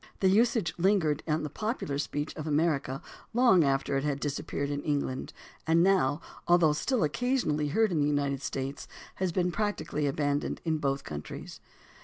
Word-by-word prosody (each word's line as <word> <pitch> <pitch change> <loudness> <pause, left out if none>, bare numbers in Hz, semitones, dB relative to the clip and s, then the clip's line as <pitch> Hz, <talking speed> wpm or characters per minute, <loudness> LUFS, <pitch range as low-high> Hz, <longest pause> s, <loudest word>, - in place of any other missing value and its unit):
The 190 - +4
usage 215 - +3
lingered 170 -6 +2
on 155 - +2
in 155 - -3
the 150 - -3
popular 215 - -3
speech 145 +1 -3
of 155 0 -5
America 150 -3 0 0.3
long 235 -9 +6
after 135 0 +1
it 135 - -1
had 145 -2 -1
disappeared 140 0 -3
in 145 0 -2
England, 145 -4 -2 0.4
and 165 +1 +4
now, 170 -6 +3 0.3
although 170 -3 +5
still 215 - 0
occasionally 155 - 0
heard 220 +8 +2
in 165 - +1
the 145 - +2
United 140 -2 0
States, 135 +1 -4 0.3
has 185 -2 0
been 180 +1 +1
practically 205 -8 -1
abandoned 145 +1 -1
in 160 -2 0
both 140 -1 -1
countries. 75 0 -7
150 Hz, 170 wpm, -29 LUFS, 145-185 Hz, 0.4 s, long